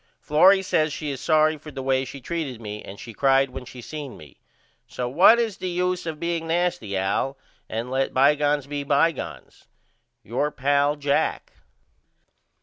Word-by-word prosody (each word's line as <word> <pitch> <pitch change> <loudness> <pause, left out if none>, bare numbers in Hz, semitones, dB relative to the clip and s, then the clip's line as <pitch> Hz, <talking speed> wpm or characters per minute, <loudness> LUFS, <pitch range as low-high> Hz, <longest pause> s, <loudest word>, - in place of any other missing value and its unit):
Florrie 190 +6 +5
says 155 -4 +1
she 150 0 -4
is 135 - -6
sorry 155 -1 +3
for 155 - -11
the 135 -3 -7
way 130 0 +1
she 140 +2 -9
treated 140 -4 -4
me 105 -2 -7
and 100 - -10
she 115 - -9
cried 135 +2 +3
when 130 0 -8
she 125 0 -10
seen 150 -2 -7
me. 75 -3 -15 0.5
So 125 - -4
what 175 - +6
is 230 -4 -1
the 185 - -4
use 180 0 -1
of 160 - -3
me - - -21
being 170 -1 -2
nasty 165 - -1
Al? 115 +8 -1 0.3
And 115 +3 -4
let 135 0 0
bygones 145 +1 +3
be 145 0 -4
bygones. 145 +3 -1 0.6
Your 130 +7 -1
pal, 145 +1 +1
JACK. 145 -1 -1
145 Hz, 170 wpm, -24 LUFS, 130-160 Hz, 0.6 s, what